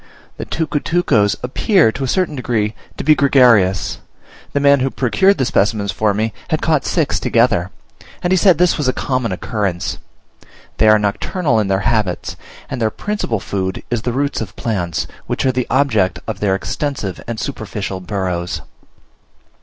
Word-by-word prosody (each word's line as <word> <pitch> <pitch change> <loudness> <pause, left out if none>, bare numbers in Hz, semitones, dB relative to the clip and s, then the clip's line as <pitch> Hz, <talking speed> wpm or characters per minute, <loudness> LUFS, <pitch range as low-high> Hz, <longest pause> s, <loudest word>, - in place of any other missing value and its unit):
The - - -5
tucutucos 150 -8 +1
appear, 155 - +3
to 135 - -5
a - - -1
certain 180 +1 0
degree, 115 -5 -1 0.2
to - - -4
be 155 - +6
gregarious: 125 -10 +3 0.5
the 140 - 0
man 140 0 +5
who 130 +1 +1
procured 190 +12 +2
the 130 - +1
specimens 100 -2 +1
for 110 -1 +1
me 110 +1 -1
had 155 -2 0
caught 155 -3 +2
six 160 -6 0
together, 115 -7 +2 0.5
and 175 +1 +2
he - - +4
said 185 -3 +5
this 180 -1 +2
was 145 - 0
a 130 - +2
common 130 -5 -1
occurrence. 95 -2 -2 0.8
They 110 - +4
are 110 0 +7
nocturnal 115 - 0
in 105 - 0
their 95 0 +1
habits; 105 -6 -1 0.3
and 125 - -5
their 110 - +2
principal 160 - -3
food 95 -1 -3
is 120 -2 0
the 120 - -2
roots 140 +2 -1
of 95 -4 -6
plants, 90 -8 -2 0.2
which - - -1
are 130 - +4
the 125 -1 -2
object 110 -10 +2
of 110 -3 -4
their 100 -2 +1
extensive 105 - -3
and 115 -2 -4
superficial 105 -7 -4
burrows. 90 -2 -3
115 Hz, 170 wpm, -18 LUFS, 100-140 Hz, 0.8 s, are